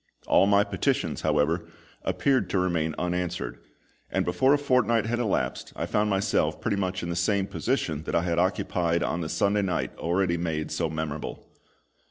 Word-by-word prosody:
All 95 - +4
my 100 0 +5
petitions, 100 -3 -1
however, 80 +2 +1 0.4
appeared 130 -9 +1
to 95 - 0
remain 85 -4 0
unanswered; 90 -8 -2 0.5
and - - 0
before 130 +1 +3
a 145 - +6
fortnight 125 -6 +2
had 120 +1 -1
elapsed 110 -5 -1
I - - -2
found 105 0 +1
myself 95 -1 +1
pretty 100 - -1
much 95 -2 -2
in 85 - -3
the 85 - -2
same 95 +3 +1
position 95 - -1
that - - -2
I 85 - +2
had 85 -1 0
occupied 90 -2 +1
on 85 - -1
the 80 - -3
Sunday 100 +4 +2
night 95 -3 -2
already 85 +1 +1
made 80 -2 -2
so 85 -2 -1
memorable. 80 -1 -4
90 Hz, 175 wpm, -27 LUFS, 85-100 Hz, 0.5 s, a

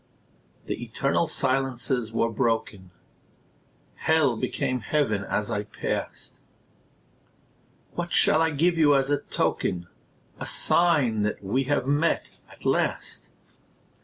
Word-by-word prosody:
The 120 - -4
eternal 135 +7 0
silences 130 -4 0
were 115 0 0
broken; 115 -5 -1 1.1
Hell 155 -6 +2
became 125 +1 -2
Heaven 110 -6 0
as 105 +3 -2
I 105 -2 0
passed. 105 - -5 1.5
What 175 0 -4
shall 155 - +4
I 165 - +3
give 165 +3 +1
you 145 -2 +5
as 135 +1 +1
a 145 - +2
token, 90 -1 -1 0.5
A - - -5
sign 145 -11 +2
that 105 0 -2
we 125 +8 0
have 145 -2 0
met, 145 +4 +1 0.3
at - - -17
last? - - -1
130 Hz, 115 wpm, -26 LUFS, 115-150 Hz, 1.5 s, you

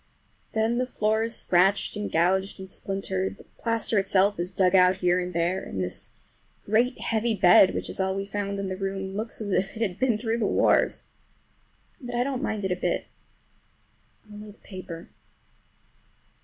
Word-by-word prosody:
Then 225 +2 +1
the 255 - 0
floor 220 -2 0
is 230 0 0
scratched 190 +4 +2
and 210 0 -4
gouged 190 +4 +1
and 190 - -8
splintered, 190 0 -3
the - - -15 0.2
plaster 230 -2 0
itself 195 +1 +2
is 175 +1 -2
dug 185 -1 +2
out 185 0 +6
here 180 -1 +2
and 180 0 -3
there, 170 +2 0
and 95 - -6
this 90 -1 -4 0.6
great 230 +5 +1
heavy 225 0 0
bed, 190 +1 +6
which - - -3
is - - -5
all 190 0 0
we 195 0 -3
found 200 0 -3
in 195 -1 -3
the 185 - -3
room, 195 0 -4
looks 220 +3 -4
as 205 -2 -4
if 195 +3 0
it - - -6
had 195 -3 -3
been 250 -4 +2
through 225 +1 -2
the 215 - +1
wars. - - +2 1.0
But 245 -1 -6
I 240 - +2
don't 265 -1 -3
mind 210 -2 -2
it 190 - -1
a - - +2
bit—only 210 +3 -9
the - - -25
paper. 185 -4 -9
195 Hz, 180 wpm, -26 LUFS, 185-220 Hz, 1.0 s, out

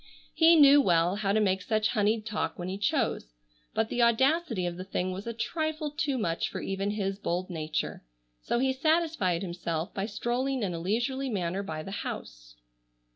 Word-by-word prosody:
He 330 +1 +6
knew 290 -2 +8
well 175 -3 +2
how 200 -2 0
to 215 - +3
make 190 -3 +1
such 215 +2 +1
honeyed 215 0 +1
talk 205 -7 -2
when 175 - -5
he 195 +1 -4
chose, 220 - 0 0.4
but 220 0 +1
the 245 - 0
audacity 235 - +2
of 175 -1 -2
the 185 - -6
thing 185 -1 -2
was 195 +4 -6
a - - -1
trifle 310 +6 -2
too 295 -3 -1
much 170 -8 -1
for - - -5
even 195 +1 -2
his 200 -2 -2
bold 180 -1 -2
nature, 155 -2 -3 0.4
so - - -1
he 265 +2 +2
satisfied 300 - +1
himself 170 -1 -3
by 195 +1 -2
strolling 245 +4 -1
in 185 -3 -1
a 165 - -4
leisurely 240 +9 -1
manner 190 -3 -1
by 155 -5 -5
the 195 - -7
house. - - -7
205 Hz, 185 wpm, -29 LUFS, 180-265 Hz, 0.4 s, knew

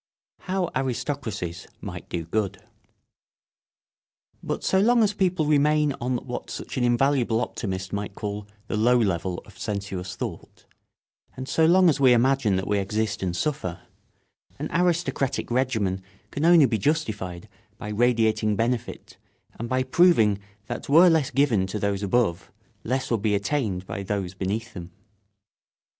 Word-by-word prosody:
[Sidenote: 185 -2 -2
How 135 - 0
aristocracies 115 - -4
might - - -8
do 85 -2 -3
good.] 100 +2 -1 1.8
But - - -4
so 190 - +2
long 235 +3 +4
as 210 -1 +2
people 185 -5 +1
remain 150 0 +3
on 125 +1 0
what 125 - -6
such - - -6
an 130 - 0
invaluable 120 -1 +2
optimist 95 -6 -4
might 100 -1 -4
call 105 -1 -5 0.2
the 110 - -3
low 120 +3 +4
level 95 -5 -1
of - - -17
sensuous 95 -3 -4
thought, - - -7 0.7
and 130 0 -5
so 160 +2 +3
long 185 +2 +6
as 150 -3 +3
we 130 -3 +6
imagine 120 -3 +3
that 95 0 -1
we 105 0 +1
exist 105 +3 -2
and 90 -2 -2
suffer, 135 - -2 0.8
an - - -5
aristocratic 170 -8 0
regimen 110 -7 0 0.3
can 145 +3 -1
only 170 -3 +7
be 115 -4 0
justified 105 - -2 0.3
by 105 - -7
radiating 110 -1 +2
benefit 115 +2 -3 0.4
and 115 +1 -4
by 130 +1 +1
proving 130 - +4 0.3
that - - -6
were 170 +5 +7
less 160 -5 +2
given 120 -8 +2
to 95 - -4
those 100 -1 -1
above 100 -3 0 0.3
less 130 +2 -2
would 115 -3 +1
be 105 -1 +2
attained 100 -4 -1
by 100 0 -5
those 100 -2 -3
beneath 105 +5 -3
them. 85 -3 -8
115 Hz, 150 wpm, -25 LUFS, 100-140 Hz, 1.8 s, only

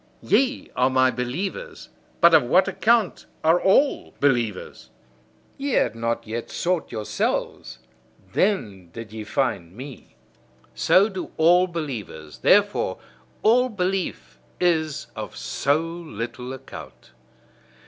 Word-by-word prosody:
Ye 270 0 +1
are 125 +1 +3
my 130 0 +3
believers: 160 - -5 0.3
but 170 0 +7
of 160 - +8
what 145 +10 +3
account 225 -3 +1 0.2
are 165 +3 +4
all 270 +9 +2
believers! 115 - -1 0.7
Ye 280 -1 -2
had - - +2
not 115 0 -2
yet 115 +2 -5
sought 180 -1 -1
yourselves: 105 - -2 0.6
then 105 - 0
did 115 -2 -9
ye 110 -1 -6
find 105 -7 -2
me. 135 +1 -10 0.6
So 65 - +4
do 190 -4 -6
all 175 +3 +5
believers; 115 - -6
therefore - - +3 0.5
all 250 +3 +4
belief 190 -3 -3 0.2
is 160 -4 +1
of - - -7
so 140 +2 0
little 125 -8 -6
account. 130 - -11
140 Hz, 115 wpm, -24 LUFS, 115-180 Hz, 0.7 s, of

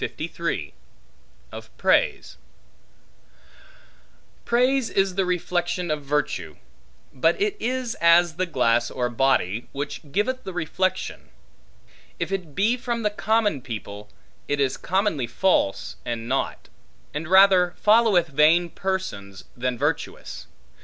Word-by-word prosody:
Of - - -9
Praise - - +1 2.1
PRAISE 250 +1 +2
is 195 -1 +1
the 190 0 0
reflection 180 -1 -1
of 150 -1 -1
virtue; 145 +1 -2 0.6
but - - +2
it 415 0 0
is 255 -3 -2
as 170 0 +5
the 185 - 0
glass 120 -6 +2
or 125 -1 -2
body, 120 -4 +1
which 145 +1 -5
giveth 255 - -1
the 190 - -6
reflection. 180 +3 -2 0.9
If - - -3
it 180 -7 -4
be 225 +5 +2
from 235 -2 -3
the 210 - +1
common 210 - +1
people, 105 -4 -7 0.4
it 145 - -1
is 135 -2 +1
commonly 185 - 0
false 125 - 0
and 115 -1 -4
naught; 135 +2 -2 0.5
and 150 +2 -4
rather 185 -1 +5
followeth 210 -6 +4
vain 155 +5 +4
persons, 100 - -4
than 125 0 -2
virtuous. - - -3
175 Hz, 115 wpm, -24 LUFS, 135-200 Hz, 2.1 s, as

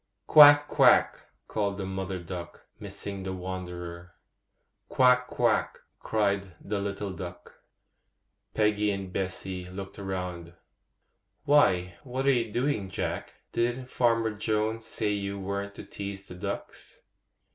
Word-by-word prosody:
'Quack! 145 -1 +9
quack!' - - +4 0.2
called 100 -2 -1
the 95 - -3
mother 95 0 -3
duck, 85 -1 -8
missing 100 -1 -7
the 95 0 -4
wanderer. 90 -2 -6 0.7
'Quack! 125 -1 +4
quack!' - - +1 0.2
cried 100 -4 0
the 105 0 -3
little 100 0 -3
duck. 90 0 -9 0.9
Peggy 105 -1 +2
and 95 -2 -4
Bessy 95 -1 -4
looked 95 +1 -8
round. 90 -3 -5 0.9
'Why, 90 -12 +3
what 130 0 -3
are 140 - +6
you 115 -4 0
doing, 120 -5 -1
Jack? - - -4 0.2
Didn't 120 +2 -1
Farmer 115 -2 +2
Jones 110 +1 -1
say 105 -1 -1
you 100 -1 -3
weren't 100 +1 -4
to - - -8
tease 100 -1 -7
the - - -9
ducks? 90 - -7
100 Hz, 125 wpm, -28 LUFS, 95-110 Hz, 0.9 s, Quack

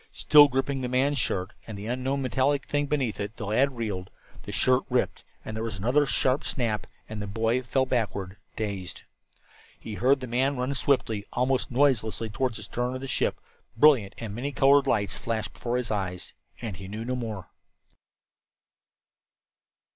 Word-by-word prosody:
Still 150 -1 +7
gripping 135 0 -1
the 125 - -1
man's 135 +3 +2
shirt, 95 -2 -1
and 110 -3 -6
the 100 - -7
unknown 130 +3 -1
metallic 130 +2 +1
thing 145 0 0
beneath 135 -8 -1
it, 105 +2 -4
the 110 - -5
lad 125 +5 +2
reeled. 100 -5 -3 0.3
The - - -8
shirt 130 0 +3
ripped, 125 -1 0 0.2
there 110 0 -4
was 115 -4 -3
another 130 +9 +2
sharp 130 +1 +1
snap, 110 -6 -1 0.2
and 110 -1 -6
the 105 - -4
boy 115 +4 +1
fell 130 +2 +1
backward, 105 -6 -2 0.2
dazed. 100 -4 -4 0.8
He 110 - -7
heard 130 +6 +3
the 130 - -5
man 130 +3 +1
run 125 +2 -1
swiftly, 120 -6 0
almost 125 +1 +1
noiselessly 115 -5 +1
toward 125 +2 -1
the - - -6
stern 125 +1 -2
of 130 - -5
the 135 - -5
ship; - - 0 0.4
brilliant 120 -8 +5
and 110 -3 -6
many 130 +6 -3
colored 140 0 +5
lights 100 -2 0
flashed 110 -2 -3
before 120 0 -2
his 125 -2 -2
eyes 95 -4 -3 0.3
and 110 -6 -5
he 95 - -8
knew 110 +3 -5
no 125 +1 -1
more. 110 -7 -5
120 Hz, 170 wpm, -27 LUFS, 105-135 Hz, 0.8 s, Still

